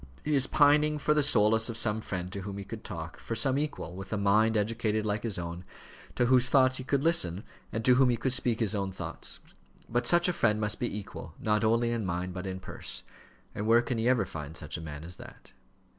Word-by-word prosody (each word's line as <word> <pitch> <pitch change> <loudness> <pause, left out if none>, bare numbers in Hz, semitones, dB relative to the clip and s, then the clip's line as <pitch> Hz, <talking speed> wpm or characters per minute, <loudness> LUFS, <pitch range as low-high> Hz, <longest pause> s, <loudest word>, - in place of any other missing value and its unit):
He 150 - 0
is 135 -2 +3
pining 150 +1 +4
for 150 +1 +2
the 150 - +3
solace 110 -5 +3
of 115 - -3
some 110 -1 0
friend 90 -3 -5
to 100 - -4
whom 100 0 -6
he 100 - -5
could 110 +3 -8
talk 80 -4 -7
for 115 - -4
some 135 +3 +2
equal, 145 - -4
with 95 0 -8
a 110 - 0
mind 105 +3 +3
educated 110 0 0
like 105 0 -1
his 110 -3 -3
own, 85 0 -5 0.5
to 120 - +2
whose 125 0 +4
thoughts 130 -1 +4
he - - -5
could 140 +1 0
listen, 100 - +1 0.3
and 110 0 -3
to 125 - +7
whom 130 0 +5
he 120 - +1
could 130 +1 0
speak 120 -3 0
his 110 -2 +2
own 100 -2 -2
thoughts. 95 - -6 0.5
But 120 +1 0
such 175 +4 +4
a 180 - +1
friend 110 -9 +2
must 105 -1 0
be 120 -4 -2
equal, 105 - -8
not 105 0 +1
only 115 +2 +2
in 115 -2 -1
mind, 90 0 -3
but 90 +1 -5
in 95 0 -4
purse; - - -6 0.5
and 105 - -3
where 115 +1 +5
can 120 -2 -2
he 115 +2 +2
ever 130 -2 +3
find 80 +1 -7
such 75 - -6
a 85 - -5
man 75 -1 -7
as 85 +1 -8
that?" - - -13
110 Hz, 240 wpm, -29 LUFS, 95-125 Hz, 0.5 s, to